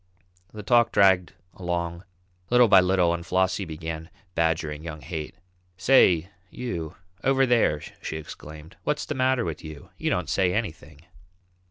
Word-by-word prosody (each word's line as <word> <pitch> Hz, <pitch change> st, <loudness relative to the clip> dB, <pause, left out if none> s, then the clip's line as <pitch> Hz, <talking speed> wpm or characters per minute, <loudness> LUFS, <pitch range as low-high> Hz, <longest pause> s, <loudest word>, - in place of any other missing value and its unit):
The 105 Hz, -1 st, -8 dB
talk 120 Hz, +1 st, +4 dB
dragged 95 Hz, -2 st, +4 dB, 0.2 s
along 85 Hz, -1 st, -3 dB, 0.4 s
little 125 Hz, 0 st, +6 dB
by 95 Hz, -3 st, +7 dB
little 90 Hz, -2 st, +2 dB
and 85 Hz, 0 st, -4 dB
Flossie 95 Hz, +2 st, 0 dB
began 80 Hz, 0 st, -6 dB, 0.2 s
badgering 80 Hz, -2 st, -1 dB
young 80 Hz, -2 st, -7 dB
Haight. 80 Hz, 0 st, -6 dB, 0.4 s
"Say, 90 Hz, -6 st, +4 dB, 0.2 s
you 85 Hz, -12 st, -5 dB, 0.3 s
over 135 Hz, 0 st, +3 dB
there," 115 Hz, -, +2 dB, 0.2 s
she 80 Hz, -, -4 dB
exclaimed, 75 Hz, 0 st, -11 dB
"what's 150 Hz, 0 st, -1 dB
the -, -, -3 dB
matter 130 Hz, -2 st, +1 dB
with 80 Hz, -3 st, -5 dB
you? 80 Hz, -3 st, -10 dB
You -, -, 0 dB
don't -, -, -1 dB
say 90 Hz, -2 st, +1 dB
anything." 80 Hz, -9 st, -5 dB
90 Hz, 145 wpm, -25 LUFS, 80-110 Hz, 0.4 s, by